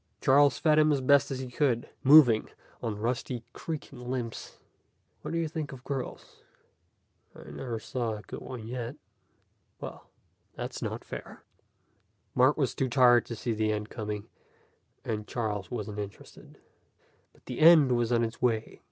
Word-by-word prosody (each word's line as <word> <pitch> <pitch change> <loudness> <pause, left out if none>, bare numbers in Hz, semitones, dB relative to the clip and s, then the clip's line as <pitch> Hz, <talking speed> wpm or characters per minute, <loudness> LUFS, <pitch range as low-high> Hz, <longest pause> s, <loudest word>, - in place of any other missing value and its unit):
Charles 140 0 +5
fed 155 -2 +4
him 155 0 +5
as 140 - +2
best 140 +2 +4
he 130 -1 -4
could, 125 -3 +1
moving 135 -6 +7 0.3
on 110 -3 -3
rusty, 120 +2 -2
creaking 140 -6 -7
limbs. 120 -3 -5 0.6
"What - - -6
do 165 - -2
you 165 -1 0
think 155 -2 -5
of 130 -2 -10
girls?" 135 -2 -6 0.9
"I - - -11
never 120 -3 -4
saw 115 0 -3
a 105 - -9
good - - -8
one 120 -4 -7
yet." 120 +2 -5 0.8
"Well, - - -9 0.5
that's - - -5
not - - -4
fair." - - -9 0.9
Mark 130 +3 +4
was 135 -5 0
too 130 - -1
tired 120 -1 +5
to 115 - -5
see 115 - -3
the 110 0 0
end 105 0 -3
coming, 105 -2 -5 0.8
and 105 -1 -3
Charles 105 -5 -3
wasn't 105 -3 -5
interested. 100 -1 -9 0.7
But - - -27
the 125 - -6
end 155 -4 +7
was 120 -1 +1
on 120 -1 +3
its 115 +1 -4
way. 115 -3 0
125 Hz, 155 wpm, -29 LUFS, 115-135 Hz, 0.9 s, moving